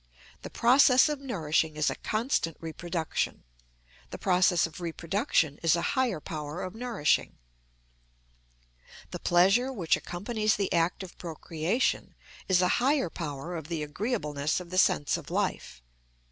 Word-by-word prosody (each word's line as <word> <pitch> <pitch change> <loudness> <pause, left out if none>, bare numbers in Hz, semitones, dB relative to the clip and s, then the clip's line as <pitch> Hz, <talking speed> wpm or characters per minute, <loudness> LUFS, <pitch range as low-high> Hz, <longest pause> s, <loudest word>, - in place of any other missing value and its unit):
The - - -7
process 255 +3 +5
of 295 -2 -2
nourishing 160 - -1
is 150 - +2
a - - -4
constant 215 - -1
reproduction; 165 0 -3 0.7
the - - -7
process 180 -1 +3
of 165 +2 -8
reproduction 165 - 0
is 165 -1 +4
a 170 - -2
higher 255 - +1
power 150 0 -6
of 185 0 -5
nourishing. 225 - 0 1.7
The - - -5
pleasure 195 +9 +3
which 185 -10 +1
accompanies 215 +4 -1
the 200 -1 -1
act 170 +2 +1
of 185 - -10
procreation 165 - -2 0.3
is 185 -1 +4
a - - +4
higher 265 - +2
power 155 +1 -5
of 160 -3 -6
the 165 -3 -3
agreeableness 150 - -2
of 180 -1 -10
the 185 - +2
sense 75 - +2
of - - -10
life. - - -3
175 Hz, 140 wpm, -28 LUFS, 160-215 Hz, 1.7 s, process